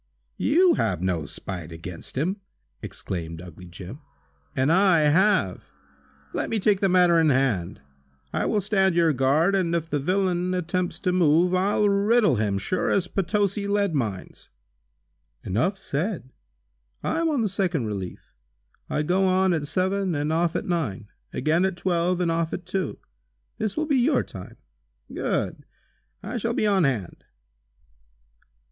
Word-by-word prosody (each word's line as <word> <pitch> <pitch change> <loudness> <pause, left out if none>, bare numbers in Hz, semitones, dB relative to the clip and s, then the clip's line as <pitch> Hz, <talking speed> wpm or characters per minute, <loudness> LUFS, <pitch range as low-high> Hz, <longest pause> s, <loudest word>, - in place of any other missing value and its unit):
"You 345 +5 +4
have - - 0
no 90 -5 -1
spite 90 -4 -6
against 85 +6 -8
him," 180 +8 0 0.4
exclaimed 85 -3 -6
ugly 90 +1 -11
Jim, 90 - -9 0.6
"and 130 +4 +2
I 185 -2 +5
have. 150 - +2 0.7
Let - - -2
me 225 - 0
take 205 -1 +2
the 195 - +2
matter 180 -2 +5
in 160 -1 +4
hand. 120 -10 0 0.5
I - - 0
will 210 - +1
stand 190 -2 +2
your 165 -2 +4
guard, 140 +8 +2
and 175 -3 +1
if 165 -1 -3
the 145 - +1
villain 185 +2 0
attempts 180 0 -2
to 180 - +1
move, 175 0 +3
I'll 200 +3 +2
riddle 205 - +3
him, 105 -2 0
sure 180 - -1
as 185 -2 +1
Potosi 200 +2 0
lead 200 -3 +1
mines." 110 -10 -4 0.9
"Enough 125 - 0
said. 165 - -3 0.7
I - - 0
am 335 -1 +1
on 290 -6 +1
the 220 - +1
second 180 - -1
relief. 100 -4 -6 0.6
I 150 - 0
go 185 +5 +2
on 185 0 +3
at 150 -3 -2
seven 190 +1 0
and 150 +2 -1
off 170 0 +1
at - - -2
nine; 115 - -2 0.2
again 155 +6 +1
at 190 -2 0
twelve 180 0 0
and 175 -2 +1
off 165 0 -1
at 180 - -5
two. 190 -6 -3 0.6
This 215 +3 -2
will 310 - +1
be 290 -3 +2
your 260 +2 +3
time." 90 - -10 0.6
"Good! - - -2 0.6
I 220 +5 -4
shall 235 +1 -1
be - - +1
on 195 -5 +3
hand!" 115 -10 -2
175 Hz, 155 wpm, -25 LUFS, 135-195 Hz, 0.9 s, I